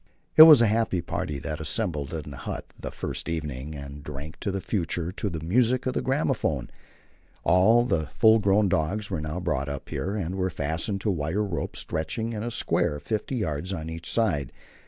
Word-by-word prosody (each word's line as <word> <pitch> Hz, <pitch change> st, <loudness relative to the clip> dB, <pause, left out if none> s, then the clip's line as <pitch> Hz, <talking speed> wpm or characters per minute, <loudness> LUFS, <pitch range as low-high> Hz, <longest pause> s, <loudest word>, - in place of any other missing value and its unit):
It -, -, +10 dB
was 145 Hz, -6 st, +9 dB
a -, -, +6 dB
happy 110 Hz, -3 st, +1 dB
party 75 Hz, -3 st, -3 dB
that 75 Hz, +3 st, -5 dB
assembled 75 Hz, -2 st, -1 dB
in 75 Hz, -3 st, -5 dB
the 70 Hz, -, -8 dB
hut -, -, -5 dB
the -, -, -6 dB
first -, -, -4 dB
evening, 75 Hz, -2 st, -4 dB
and 70 Hz, 0 st, -8 dB
drank 75 Hz, +3 st, -8 dB
to -, -, -2 dB
the 95 Hz, 0 st, -2 dB
future 85 Hz, -3 st, -2 dB
to 100 Hz, +2 st, -3 dB
the 80 Hz, -3 st, -5 dB
music 120 Hz, +7 st, +2 dB
of 130 Hz, -, 0 dB
the -, -, -1 dB
gramophone. 130 Hz, -, 0 dB, 0.7 s
All 110 Hz, +7 st, +5 dB
the 80 Hz, -10 st, 0 dB
full 110 Hz, +5 st, +5 dB
grown 100 Hz, 0 st, +3 dB
dogs 95 Hz, +5 st, -1 dB
were 85 Hz, -5 st, -1 dB
now 75 Hz, +3 st, -4 dB
brought 70 Hz, -6 st, -1 dB
up 70 Hz, -1 st, -6 dB
here, 100 Hz, +2 st, -3 dB
and 90 Hz, -4 st, -2 dB
were 95 Hz, -1 st, 0 dB
fastened 80 Hz, +6 st, -3 dB
to 105 Hz, -, +1 dB
wire 85 Hz, +4 st, -1 dB
ropes 95 Hz, -5 st, -3 dB
stretched 80 Hz, +4 st, -3 dB
in 115 Hz, -1 st, -2 dB
a 120 Hz, -, -2 dB
square, 75 Hz, -9 st, 0 dB
50 110 Hz, -, -3 dB
yards 90 Hz, -, -2 dB
on 80 Hz, -2 st, -5 dB
each 80 Hz, +1 st, -6 dB
side. 85 Hz, -, +1 dB
90 Hz, 200 wpm, -26 LUFS, 75-105 Hz, 0.7 s, It